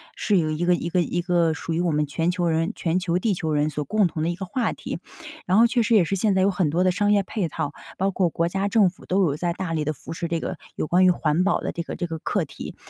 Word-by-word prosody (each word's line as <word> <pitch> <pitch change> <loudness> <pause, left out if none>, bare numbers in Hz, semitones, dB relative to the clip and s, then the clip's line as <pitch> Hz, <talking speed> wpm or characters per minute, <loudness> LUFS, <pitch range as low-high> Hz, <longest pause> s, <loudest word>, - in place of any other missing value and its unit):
是 205 - +1
有 155 -3 +1
一 155 +3 -2
个 175 0 +4
一 170 - -4
个 180 +1 +2
一 175 +1 -1
个 170 -2 +2
属 165 +2 -4
于 165 - 0
我 175 -1 +1
们 150 0 +1
全 165 +4 -1
球 175 -1 0
人 165 0 +1
全 170 +1 0
球 175 -1 0
地 205 +3 +1
球 160 -3 -2
人 150 0 +1
所 150 0 -3
共 210 +8 +2
同 165 -2 -2
的 160 - 0
一 175 - -2
个 190 +2 -6
话 230 +5 -1
题。 - - -6 0.5
然 185 +2 +3
后 230 - +7
确 235 +1 +2
实 230 +1 +2
也 200 - +6
是 185 +4 -1
现 200 +1 +1
在 190 - +3
有 200 - +3
很 180 -4 0
多 170 +5 +1
的 185 - +3
商 205 +3 +1
业 205 -1 +3
配 195 -2 -2
套， 145 -1 -4 0.2
包 195 +1 +1
括 185 -2 +1
国 170 +1 0
家 195 +3 -1
政 205 -2 +4
府 185 - -17
都 190 +2 +2
有 150 -6 +1
在 170 +2 -1
大 180 -2 -4
力 155 -2 -1
地 155 - 0
扶 155 - -8
持 170 +1 -3
这 165 0 -1
个， - - -4 0.2
有 - - -2
关 180 +4 +4
于 - - +6
环 170 -1 +1
保 200 - +1
的 - - -2
这 170 - -4
个 - - -6
这 175 - -3
个 165 -2 -5
课 - - -1
题。 - - -9
175 Hz, 335 characters per minute, -24 LUFS, 165-190 Hz, 0.5 s, 后